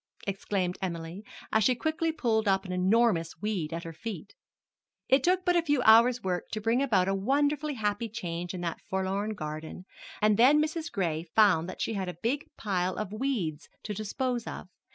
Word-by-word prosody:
exclaimed 195 -2 -2
Emily, 170 +1 -4 0.3
as 220 - +3
she 255 - +4
quickly 320 +5 -1
pulled 225 -8 0
up 195 0 +2
an 185 - -6
enormous 185 -2 +2
weed 195 -7 -2
at 165 +1 -4
her 165 - -7
feet. 200 -1 -7 0.7
It 265 0 +4
took 365 +1 +2
but 355 - +3
a 345 - +4
few 290 -6 +1
hours' 235 +2 +6
work 180 -2 -2
to 215 - -1
bring 230 +4 +1
about 200 -9 +2
a 195 - +1
wonderfully 285 +8 +1
happy 210 0 -1
change 175 -5 -5
in 180 - -5
that 170 -2 -3
forlorn 195 +3 -1
garden, 155 +1 -6 0.3
and 210 -1 +3
then 270 +6 +6
Mrs. 315 +2 -2
Gray 165 -6 -1
found 185 -6 +4
that 185 - -7
she - - -1
had 190 -3 -2
a 180 - -6
big 275 +6 0
pile 185 -3 -1
of 215 -1 -4
weeds 215 - -2
to 210 - -4
dispose 235 +4 -2
of. - - -7
210 Hz, 190 wpm, -29 LUFS, 180-250 Hz, 0.7 s, hours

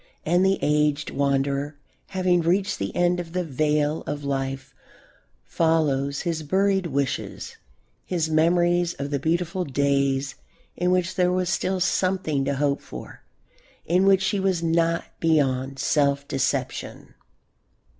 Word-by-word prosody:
And 175 +2 +3
the 190 0 +3
aged 150 0 +1
wanderer, 140 +1 0 0.3
having 185 -2 +1
reached 190 +4 0
the 100 - -4
end 175 0 +2
of 170 -1 -7
the 180 0 0
vale 150 0 0
of 145 0 -4
life, 135 -1 -3 0.7
follows 140 - +1
his 165 -3 -2
buried 190 +4 +1
wishes, 140 -3 -3 0.5
his 170 -3 -1
memories 175 +2 +2
of 140 +1 -5
the 140 - 0
beautiful 170 +4 -1
days 140 -1 0 0.4
in 180 - 0
which 180 0 +1
there 180 -1 +2
was 180 -1 0
still 185 +2 0
something 180 -6 0
to 140 0 0
hope 140 0 0
for, - - -10 0.6
in 185 +3 +2
which 190 -1 +4
he 205 - -1
was 190 -3 0
not 165 0 +1 0.2
beyond 135 -4 +1
self 140 0 +1
deception. 135 -2 -3
160 Hz, 135 wpm, -24 LUFS, 140-180 Hz, 0.7 s, which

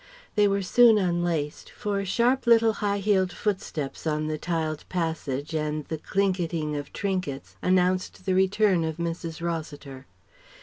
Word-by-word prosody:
They 210 -1 +4
were 200 0 0
soon 230 +3 +6
unlaced, 175 -5 -1
for 200 -1 -3
sharp 240 +6 +1
little 230 -1 +5
high 205 -1 +1
heeled 195 -2 +2
footsteps 165 -9 -3
on 155 0 0
the 155 0 -3
tiled 160 -3 -2
passage 160 -5 -2
and 150 -1 -2
the 160 - -3
clinketing 170 -5 -1
of 145 -1 -5
trinkets 185 -9 -3
announced 185 0 +1
the 190 - +1
return 190 -1 +3
of 160 0 -3
Mrs. 165 -1 -4
Rossiter. 145 -5 -5
175 Hz, 140 wpm, -26 LUFS, 155-200 Hz, -, soon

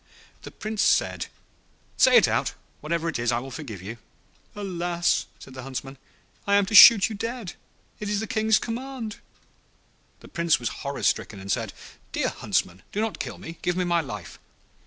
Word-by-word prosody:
The - - -9
Prince 215 0 -4
said, - - +2 0.7
'Say - - +6
it - - +6
out; - - 0 0.2
whatever 165 +2 -2
it 160 - -2
is 120 0 +1
I 120 - +1
will 130 +3 -6
forgive 115 - -7
you.' 115 +4 -7 0.6
'Alas!' 175 -3 -1
said 135 - -13
the 130 - -8
Huntsman, 135 +1 -7 0.5
'I 200 - +4
am 200 -1 +4
to 195 - -6
shoot 210 -1 +10
you 225 - -6
dead; 230 -1 -5 0.5
it 210 - -4
is 205 -1 0
the 220 - -2
King's 220 0 +2
command.' 240 -2 -5 1.0
The - - -13
Prince 170 -4 +1
was 120 - -2
horror 140 0 -4
stricken, 100 - 0
and 95 +1 -5
said, - - -1 0.4
'Dear - - 0
Huntsman, 90 +1 -2
do 205 - -3
not 220 0 -2
kill - - -5
me, 165 0 -10
give 180 0 -1
me 185 - +1
my 170 -1 +2
life. 105 - -8
170 Hz, 180 wpm, -25 LUFS, 135-210 Hz, 1.0 s, shoot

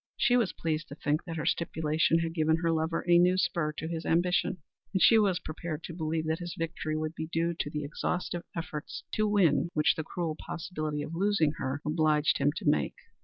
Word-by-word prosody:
She 245 -2 +3
was 235 -6 +2
pleased 155 -1 -2
to 145 - -9
think 150 +1 -1
that 165 -2 -5
her 150 - -3
stipulation 160 0 +1
had 165 0 -1
given 160 -1 +2
her 165 - +3
lover 160 +1 -1
a 175 0 +6
new 180 +1 +4
spur 170 -4 +1
to 155 +2 -5
his 165 0 -4
ambition, 175 +2 +1 0.4
and 190 - +2
she 225 +4 +7
was 195 -4 +3
prepared 165 -2 -6
to 170 - -6
believe 160 -1 -2
that 160 +1 -1
his 175 -1 -5
victory 160 -2 -2
would 155 0 -2
be 160 -1 -5
due 165 +1 0
to - - -1
the 150 0 -3
exhaustive 175 +4 -2
efforts 155 -3 -5
to 215 0 +2
win 195 -5 +3
which 150 -1 +4
the 160 - -4
cruel 165 0 -3
possibility 155 -3 -4
of 155 - -7
losing 185 -4 +2
her 135 +2 -3
obliged 155 -1 +2
him 145 - +3
to - - -6
make. 145 - +2
165 Hz, 215 wpm, -29 LUFS, 155-175 Hz, 0.4 s, she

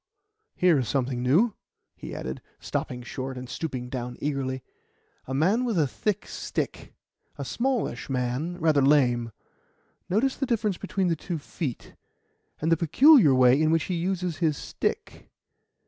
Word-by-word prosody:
"Ha! - - -30
here 175 -5 +5
is 125 - -2
something 130 -2 -1
new," 170 - +3 0.4
he - - -8
added, 65 +1 -5 0.2
stopping 125 -1 -4
short 130 +1 -5
and 125 0 -7
stooping 130 -4 -4
down 125 -1 -5
eagerly 135 -3 -2 0.6
"a 130 - -4
man 190 - +2
with 235 -6 0
a 155 - +4
thick 210 +9 -2
stick - - -4 0.4
a - - -5
smallish 240 - -1
man, 130 +7 -2
rather 155 -4 +3
lame. 125 -5 +3 0.8
Notice 235 +8 +2
the 270 - -1
difference 215 -5 0
between 195 -2 -1
the 165 - +2
two 170 +2 -4
feet, 145 -3 -6 0.7
and 160 +2 0
the 165 - +5
peculiar 190 - +6
way 130 +2 +5
in 155 - +3
which 165 -1 +2
he 185 - -3
uses 180 -1 -1
his 155 -2 +1
stick. - - -4
155 Hz, 155 wpm, -26 LUFS, 130-185 Hz, 0.8 s, peculiar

